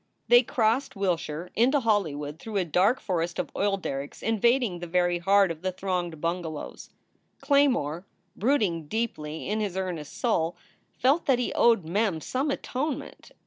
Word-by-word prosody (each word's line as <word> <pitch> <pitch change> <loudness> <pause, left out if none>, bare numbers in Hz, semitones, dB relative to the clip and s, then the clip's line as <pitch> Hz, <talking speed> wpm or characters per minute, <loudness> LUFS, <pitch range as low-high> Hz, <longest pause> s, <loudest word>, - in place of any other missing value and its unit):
They 240 0 +8
crossed 230 +1 0
Wilshire 175 -3 -2
into 260 +6 +3
Hollywood 160 - -1
through 220 +1 -4
a 185 - +1
dark 185 - +2
forest 170 -2 -2
of - - -3
oil 200 0 +1
derricks 140 -6 -5
invading 225 -3 +2
the 175 - -6
very 175 0 +1
heart 195 +1 +4
of 160 -1 -7
the 185 0 -1
thronged 180 -4 -3
bungalows. 165 -2 -4 0.5
Claymore, 245 - +2 0.3
brooding 200 - +1
deeply 160 -8 -3
in 210 +2 -1
his 200 -3 -2
earnest 175 -6 -4
soul, 170 -8 0 0.4
felt 280 +7 +2
that 265 -3 +4
he 245 - -2
owed 230 -7 +4
Mem 195 0 0
some 265 - -2
atonement. 275 +1 -4
190 Hz, 150 wpm, -27 LUFS, 170-235 Hz, 0.5 s, They